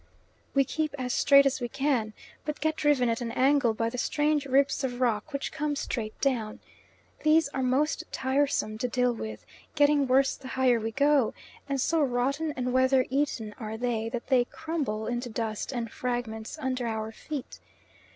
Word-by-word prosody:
We 275 - +5
keep 305 +2 -2
as 250 -2 -2
straight 280 -1 +6
as 270 -1 +1
we 240 - -2
can, 265 -5 0 0.3
but 300 0 -4
get 315 0 0
driven 295 -5 +2
at 230 +1 0
an 235 -1 -3
angle 265 -4 +3
by 230 +1 -1
the 250 - -4
strange 295 +1 +1
ribs 275 +1 +2
of 250 -2 -2
rock 235 +2 0
which 280 -1 -3
come 295 0 -2
straight 220 -6 -4
down. 235 -6 -1 0.6
These 310 0 +4
are 270 - -3
most 265 +4 +1
tiresome 260 -5 0
to 250 - 0
deal 250 0 +1
with, 110 - -7 0.3
getting 290 -2 +4
worse 265 +1 +3
the 265 - -11
higher 255 -3 +4
we 225 0 -2
go, 280 -1 +3 0.3
and 275 -1 0
so 320 +5 +2
rotten 275 +4 0
and 250 -1 -1
weather 260 0 +4
eaten 265 -6 -1
are 220 -1 -5
they 230 -2 -1
that 235 0 -4
they 255 -3 +3
crumble 295 -9 -3
into 240 +1 -3
dust 220 0 -3
and 235 -3 -4
fragments 240 0 -4
under 260 -4 -2
our 220 -1 -3
feet. 285 +4 -7
255 Hz, 180 wpm, -28 LUFS, 230-280 Hz, 0.6 s, straight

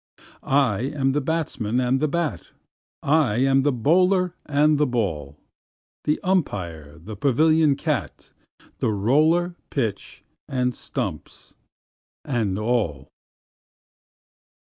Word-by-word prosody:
I 135 -7 +2 0.2
am 135 -2 +1
the 145 +2 0
batsman 130 -7 -1
and 130 +1 +1
the 155 - +1
bat, 170 0 -3 0.5
I 145 -7 +2
am 135 +2 +3
the 145 +2 +2
bowler 180 - +2
and 150 +1 +3
the 150 - +3
ball, 80 - -2 0.7
The 150 - +1
umpire, 90 - -2
the 100 +7 -9
pavilion 150 +5 +3
cat, - - -4 0.5
The - - +1
roller, 155 - +2 0.2
pitch, 115 -8 -4 0.2
and 125 -1 -1
stumps, - - -6 0.7
and 110 -8 -1
all. 105 - -1
135 Hz, 105 wpm, -23 LUFS, 110-155 Hz, 0.7 s, am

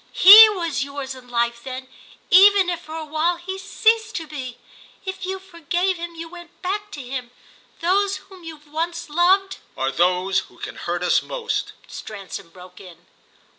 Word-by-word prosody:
"_He 425 +4 +11
_was 335 -9 -2
yours 280 -1 -6
in 255 -1 -14
life 235 0 -1
then, 260 0 -7 0.4
even 390 -1 +6
if 345 - -3
for 315 -1 -10
a 320 -1 -5
while 315 +3 0
he 380 +2 -7
ceased 445 +3 +1
to 325 - -4
be. 265 -5 -8 0.5
If 380 -1 -5
you 380 0 -3
forgave 360 0 -2
him 340 0 -7
you 330 0 -7
went 345 0 -14
back 410 +3 -3
to 285 - -7
him. 250 -1 -6 0.5
Those 395 +3 +1
whom 380 -2 -16
we've 315 -3 -11
once 335 +1 -4
loved—" 380 +4 +2 0.2
"Are 135 +1 -1
those 180 +4 +1
who - - -13
can - - -8
hurt - - -4
us - - +3
most," - - -4
Stransom 200 -3 -9
broke 180 +1 -15
in. 175 -2 -15
335 Hz, 170 wpm, -22 LUFS, 255-380 Hz, 0.5 s, He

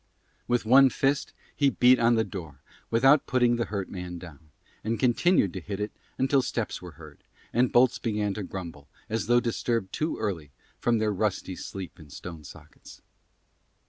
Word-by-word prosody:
With 120 -2 +1
one 135 +4 +7
fist 135 +2 0 0.2
he 140 -2 +3
beat 125 -1 +5
on 115 0 +4
the 110 - +2
door 80 -11 -9 0.3
without 135 +5 +4
putting 120 -1 +3
the 120 - 0
hurt 100 -3 -4
man 90 -1 -6
down, 80 -3 -12 0.3
and 115 +2 -2
continued 125 - +3
to - - -4
hit 100 +3 -6
it 105 +1 -3 0.3
until 135 +1 +3
steps - - -3
were - - -10
heard, - - -14 0.3
and 125 +1 +2
bolts 120 0 +4
began 105 -2 -1
to 105 - -5
grumble, 85 -7 -8 0.2
as 110 -1 -1
though 120 0 +5
disturbed 115 -4 -2
too 155 +2 -1
early 85 -9 -3 0.3
from 120 -1 +2
their 110 -1 0
rusty 95 -2 -2
sleep 95 -1 -8
in 75 -2 -14
stone 80 +2 -9
sockets. 70 - -14
110 Hz, 175 wpm, -27 LUFS, 90-120 Hz, 0.3 s, one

